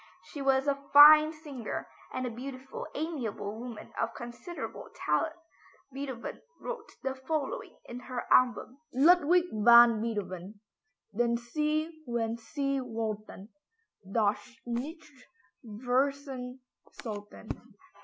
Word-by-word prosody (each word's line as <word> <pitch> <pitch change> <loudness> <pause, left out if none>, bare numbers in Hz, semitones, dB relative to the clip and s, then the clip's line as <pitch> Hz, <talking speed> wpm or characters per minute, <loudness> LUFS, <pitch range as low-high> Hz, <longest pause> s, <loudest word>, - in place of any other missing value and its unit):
She 290 - -8
was 270 0 +3
a 280 0 0
fine 305 +2 +10
singer, 295 -7 -6 0.2
and 255 - -3
a 245 - -3
beautiful, 260 +2 -7
amiable 250 -10 -3
woman 240 -2 -8
of 230 0 -2
considerable 240 +9 -7
talent. 320 -1 0 0.6
Beethoven 265 -3 -6 0.2
wrote - - -6
the 265 0 -1
following 310 - -3
in 240 - -7
her 250 -1 -5
album: 255 +1 +3
Ludwig 340 +4 +5
van 235 +1 +7
Beethoven 205 -3 -4 0.6
Den 235 +1 +2
Sie 305 +6 -2
wenn 230 -1 -1
Sie 275 +4 -2
wollten 215 -4 -5 0.6
Doch 210 -1 +2 0.3
nicht 265 +3 -6 0.4
vergessen 255 +3 -2 0.4
sollten. 205 -3 -8
255 Hz, 105 wpm, -30 LUFS, 230-290 Hz, 0.6 s, fine